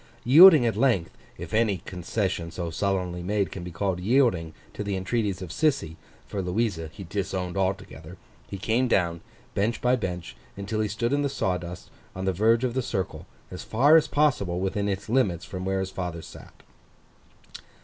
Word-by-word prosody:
Yielding 155 +1 +9
at 115 - +1
length, 110 -8 +1 0.2
if 85 0 -8
any 110 -3 +2
concession 90 0 -3
so 85 0 -5
sullenly 90 -1 -1
made 100 +2 -1
can 90 - -7
be 90 - -6
called 90 +2 -2
yielding, 100 -6 +2 0.2
to - - -4
the 100 -1 -2
entreaties 95 0 -2
of 90 - -7
Sissy—for 90 - -2
Louisa 90 -3 -1
he 90 +4 -9
disowned 95 -1 -3
altogether—he 95 -6 -5
came 115 +6 +1
down, 85 -6 +1 0.3
bench 110 +4 0
by 125 +1 +3
bench, 90 - -5 0.2
until 100 +2 -3
he 105 - 0
stood 115 +5 -1
in 145 - +2
the 140 - 0
sawdust, 90 -6 -3 0.2
on 95 +1 -4
the 95 - +1
verge 115 +6 +3
of 125 -2 0
the 130 - 0
circle, 95 -6 -4 0.2
as 90 - -7
far 140 +8 +4
as 160 - +5
possible, 115 -13 +1
within 100 +2 -1
its 100 0 -3
limits 105 -8 +1
from 95 -1 -6
where 95 0 0
his 95 0 -3
father 90 -3 -5
sat. - - -14
95 Hz, 170 wpm, -26 LUFS, 90-115 Hz, 0.3 s, Yielding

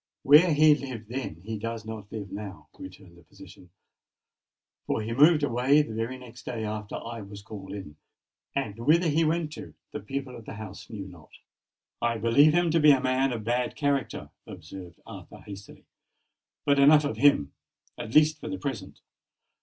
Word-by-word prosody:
"Where 155 +5 +7
he 155 0 +7
lived 130 -7 -6
then, 120 -10 -5
he 110 +1 -5
does 115 0 -5
not 110 -2 -8
live 105 -4 -6
now," 100 -1 -8
returned 90 -2 -12
the - - -20
physician; 95 +1 -16 1.2
"for 110 - -1
he 115 +2 -3
moved 150 +4 +5
away 135 +3 +3
the 115 - -8
very 115 +4 -3
next 125 -1 -13
day 115 -3 -4
after 105 -1 -5
I 115 -1 -6
was 100 0 -10
called 100 -2 -9
in; 95 -7 -8 0.6
and 115 -6 -3
whither 160 +8 +3
he 160 +3 +2
went 160 -1 0
to, - - -10 0.2
the - - -5
people 135 +4 -5
of 115 - -11
the - - -8
house 105 -2 -9
knew 100 -4 -7
not." 90 -5 -15 0.7
"I 120 -1 0
believe 115 +7 +5
him 175 -1 +2
to 165 - +3
be 150 -1 +6
a 135 - +4
man 130 +1 +1
of 115 -3 -4
bad 120 +3 -1
character," 140 -3 -2 0.2
observed 90 -3 -10
Arthur - - -11
hastily. 100 0 -11 0.8
"But 140 -1 +3
enough 150 +2 +7
of 145 - -3
him—at 115 - -1
least 155 0 +5
for 155 - -7
the 145 - -4
present. 115 -11 -6
115 Hz, 175 wpm, -27 LUFS, 105-145 Hz, 1.2 s, Where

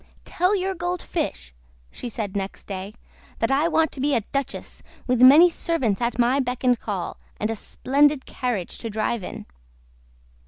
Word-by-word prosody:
"Tell 365 +4 +1
your 385 0 -1
Gold 355 0 -3
Fish," 65 - -4 0.4
she 245 - -6
said 210 -3 -4
next 195 -1 -4
day, 195 +2 -6 0.4
"that - - 0
I 285 +4 +3
want 320 -1 +2
to - - -9
be 285 +1 +2
a 230 - +2
duchess, 275 -1 -4 0.2
with 250 -1 +1
many 290 +7 +9
servants 270 - -1
at 235 0 -1
my 245 +3 +3
beck 250 -1 -2
and 250 -3 +3
call, 195 -5 -4 0.2
and 215 +1 -1
a - - -2
splendid 285 +5 +1
carriage 240 -9 -3
to 230 - -4
drive 215 0 -1
in. - - -7
250 Hz, 170 wpm, -24 LUFS, 215-295 Hz, 0.4 s, many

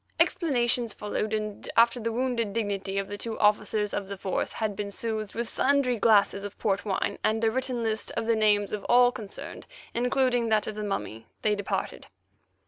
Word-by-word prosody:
Explanations 250 - +1
followed, 210 +1 -3
and 215 -1 -3
after 235 +1 +5
the 230 0 -2
wounded 235 -3 -1
dignity 200 -3 -2
of 195 0 -1
the 205 0 -6
two 225 -1 -4
officers 210 0 +2
of 200 -1 -2
the 200 0 -6
Force 190 0 -1
had 215 -2 -2
been 205 0 -4
soothed 215 0 -4
with 235 0 -2
sundry 275 -1 +2
glasses 200 -3 +4
of 205 -1 -7
port 195 -2 0
wine 195 -2 -1
and 220 +1 +1
a 225 - +3
written 255 -1 -2
list 220 -1 -1
of - - -1
the 230 0 +3
names 210 -2 +2
of 210 - -3
all 245 0 +6
concerned, 210 -4 -7 0.3
including 245 -1 +1
that 215 -1 +3
of 215 - -4
the 210 0 -5
mummy, 115 - -4 0.2
they 215 - +3
departed. 205 -1 -3
220 Hz, 190 wpm, -27 LUFS, 205-235 Hz, 0.3 s, all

